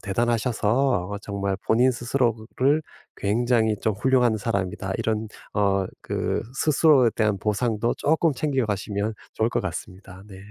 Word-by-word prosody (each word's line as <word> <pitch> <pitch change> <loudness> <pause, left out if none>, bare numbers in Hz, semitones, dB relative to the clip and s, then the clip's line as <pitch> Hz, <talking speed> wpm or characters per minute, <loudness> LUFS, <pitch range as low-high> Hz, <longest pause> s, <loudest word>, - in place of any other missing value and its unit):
대단하셔서 115 0 0
어 100 - -4
정말 100 -1 -3
본인 125 +4 +4
스스로를 120 +3 0 0.4
굉장히 110 +1 +1
좀 110 - +1
훌륭한 125 0 +2
사람이다. 95 -3 -2
이런 110 0 -1 0.3
어 100 -2 +2 0.2
그 - - -2
스스로에 140 -4 +4
대한 105 -3 +1
보상도 110 +3 0
쪼끔 160 +1 +2
챙겨가시면 110 -7 -1 0.2
좋을 110 +1 +1
것 - - 0
같습니다. 95 +1 -7
네. 95 - -11
110 Hz, 305 characters per minute, -24 LUFS, 100-125 Hz, 0.4 s, 본인